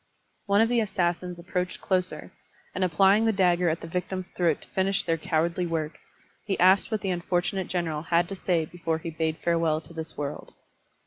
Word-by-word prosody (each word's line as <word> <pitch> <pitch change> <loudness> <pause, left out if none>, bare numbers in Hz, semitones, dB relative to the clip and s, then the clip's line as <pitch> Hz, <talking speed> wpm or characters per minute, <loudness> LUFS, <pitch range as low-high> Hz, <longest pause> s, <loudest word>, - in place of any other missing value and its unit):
One 200 +1 +4
of 225 - +3
the 240 -1 +3
assassins 180 -4 -1
approached 180 +1 -3
closer, 185 -1 -1 0.4
and 190 - -1
applying 195 +5 +4
the 225 - +4
dagger 180 -3 +3
at 160 - -2
the - - -7
victim's 180 +2 -3
throat 170 -4 0
to - - -13
fimsh 195 +1 0
their 165 - +2
cowardly 170 +2 0
work, 160 -2 -3 0.4
he 200 -3 -2
asked 185 +2 +5
what 220 -2 -1
the 195 - -1
unfortunate 180 +2 -1
general 165 -4 -2
had 170 +1 +2
to 195 - -4
say 175 -4 0
before 165 -1 -3
he 165 +1 -6
bade 160 0 -1
farewell 165 -2 +2
to 160 +1 -14
this 160 -1 -6
world. 145 0 -5
175 Hz, 190 wpm, -27 LUFS, 165-190 Hz, 0.4 s, asked